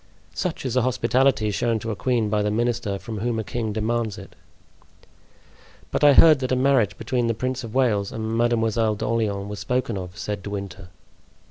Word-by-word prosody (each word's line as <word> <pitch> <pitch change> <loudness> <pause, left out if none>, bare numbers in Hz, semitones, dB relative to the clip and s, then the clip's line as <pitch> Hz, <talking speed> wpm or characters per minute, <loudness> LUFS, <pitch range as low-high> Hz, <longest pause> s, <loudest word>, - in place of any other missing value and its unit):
"Such 180 -6 -3
is 130 - -2
the 130 - +3
hospitality 125 -2 +2
shown 115 +3 0
to 110 +1 -4
a - - -3
queen 115 +2 0
by 105 0 0
the 105 - 0
minister 115 -2 -1
from 110 +1 -7
whom 115 +2 -1
a 110 - -2
king 110 0 -3
demands 110 0 -1
it." - - -12 1.6
"But - - -1
I 145 -1 +8
heard 155 0 +7
that 130 -1 -3
a - - +3
marriage 130 -5 +2
between 120 -2 -1
the 115 - 0
Prince 130 +2 -3
of 115 0 -8
Wales 110 -7 +1
and 110 0 -3
Mademoiselle 115 -2 +1
d'Orleans 105 -2 -1
was 105 0 -6
spoken 125 -4 -1
of," 90 0 -8
said 105 -2 -4
De 100 - -7
Winter. 100 -2 -6
115 Hz, 195 wpm, -23 LUFS, 105-125 Hz, 1.6 s, I